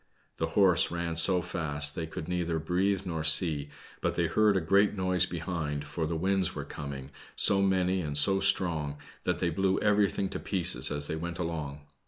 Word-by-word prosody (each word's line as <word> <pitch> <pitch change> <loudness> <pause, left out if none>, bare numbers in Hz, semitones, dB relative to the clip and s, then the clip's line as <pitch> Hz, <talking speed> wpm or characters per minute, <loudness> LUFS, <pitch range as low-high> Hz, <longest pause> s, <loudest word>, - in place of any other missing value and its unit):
The 80 - -1
horse 95 -3 +4
ran 85 -1 -4
so 90 +2 +4
fast 75 -5 0
they 80 +1 -5
could 80 0 -7
neither 85 -2 -2
breathe 90 +4 0
nor 80 -3 -4
see, 75 -2 +3 0.3
but - - -1
they - - 0
heard 105 -2 +2
a - - +2
great 100 +5 +2
noise 95 -1 +1
behind, 80 -4 -4
for 80 +2 -4
the 85 - -3
winds 95 +1 0
were - - -5
coming, 70 -2 -8 0.2
so 100 -1 +3
many 95 -1 +1
and 75 -3 -2
so 95 +6 +5
strong, 80 -7 +1 0.3
that - - 0
they 85 - -1
blew 95 +3 0
everything 105 -2 +1
to - - -5
pieces 95 -4 +2
as 75 0 -2
they 80 - -3
went 85 +1 -5
along. 80 -4 -5
85 Hz, 190 wpm, -28 LUFS, 80-95 Hz, 0.3 s, so